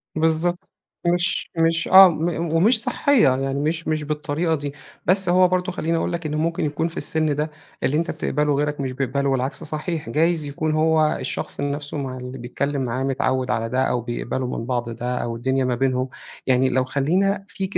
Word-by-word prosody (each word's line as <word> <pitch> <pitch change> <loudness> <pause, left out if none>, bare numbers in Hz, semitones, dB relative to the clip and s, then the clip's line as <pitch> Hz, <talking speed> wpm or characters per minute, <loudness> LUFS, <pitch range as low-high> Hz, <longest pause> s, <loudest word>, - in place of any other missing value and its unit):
بالضبط. 170 +4 0 0.4
مش 175 0 +1
مش 165 0 +2
آه. 190 0 +9
م 165 0 -1 0.3
ومش 220 +7 +4
صحّية. 280 - +3
يعني 135 +1 -2
مش 160 +3 -1
مش 155 -1 0
بالطريقة 150 +2 -1
دي. 145 -1 -5 0.3
بس 190 +1 +3
هو 180 +1 +5
برضه 185 +1 0
خلّيني 165 -1 -1
أقول - - -1
لك، 170 -1 -4
إنه 150 0 -2
ممكن 165 0 0
يكون 150 +3 -1
في 165 - -9
السن 155 -2 +1
ده 150 +1 -2 0.3
اللي 135 +4 +2
أنت 170 +2 -1
بتقبله 150 -1 0
غيرك 145 +1 -1
مش 135 -1 -2
بيقبله 135 +1 -1
والعكس 135 +4 -1
صحيح. 155 -2 -3
جايز 160 +4 +1
يكون 150 +2 -2
هو 155 0 +2
الشخص - - -3
نفسه 145 +1 -3
مع 130 -2 -4
اللي 125 +1 -7
بيتكلّم 140 +3 -3
معاه 125 +2 -2
متعوّد 130 -1 0
على 115 +1 -1
ده، 130 +2 0
أو 125 - 0
بيقبلوا 120 +1 -3
من 115 - -4
بعض 120 -1 -2
ده، 120 +2 -3
أو 115 -1 -3
الدنيا 130 +2 0
ما 125 -1 0
بينهم 130 0 0 0.4
يعني 130 0 +3
لو 130 0 +2
خلّينا 180 +10 0
فيك 195 -1 -3
150 Hz, 190 wpm, -22 LUFS, 130-165 Hz, 0.4 s, آه